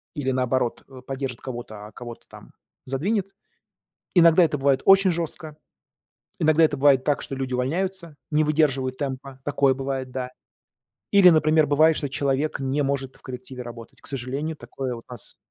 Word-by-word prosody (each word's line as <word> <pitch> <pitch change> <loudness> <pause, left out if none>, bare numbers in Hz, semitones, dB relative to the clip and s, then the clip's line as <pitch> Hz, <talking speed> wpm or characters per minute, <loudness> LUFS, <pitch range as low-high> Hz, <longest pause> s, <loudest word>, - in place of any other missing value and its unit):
или, 135 -3 -1
наоборот, 125 -1 -1
э, 130 -2 -12
поддержит 135 -3 -4
кого-то, 115 -5 -7
а - - -14
кого-то 120 0 -10
там - - -14 0.3
задвинет. 195 - -1 0.8
Иногда 170 0 +7
это 150 -2 +1
бывает 135 -1 +2
очень 195 -1 +6
жёстко, 160 -2 -5 0.8
иногда 155 -1 +4
это 150 -2 +2
бывает 135 -1 +4
так, 145 -1 0
что 135 - -3
люди 130 -1 -4
увольняются, 170 +5 -2 0.2
не 155 +1 +3
выдерживают 135 -4 +1
темпа, 135 -1 -5
такое 140 -2 +2
бывает, 135 -1 -4
да. 125 -1 -4 0.8
Или, 195 -3 +7
например, 155 -1 +4
бывает, 155 +2 +4
что 145 - -2
человек 140 +2 -1
не 135 +2 0
может 135 -1 -2
в - - -22
коллективе 130 -1 -7
работать. 115 -1 -11
К - - -17
сожалению, 140 +4 -4
такое 125 +1 -5
вот 115 - -10
у - - -11
нас 120 - -6
135 Hz, 165 wpm, -24 LUFS, 130-155 Hz, 0.8 s, Иногда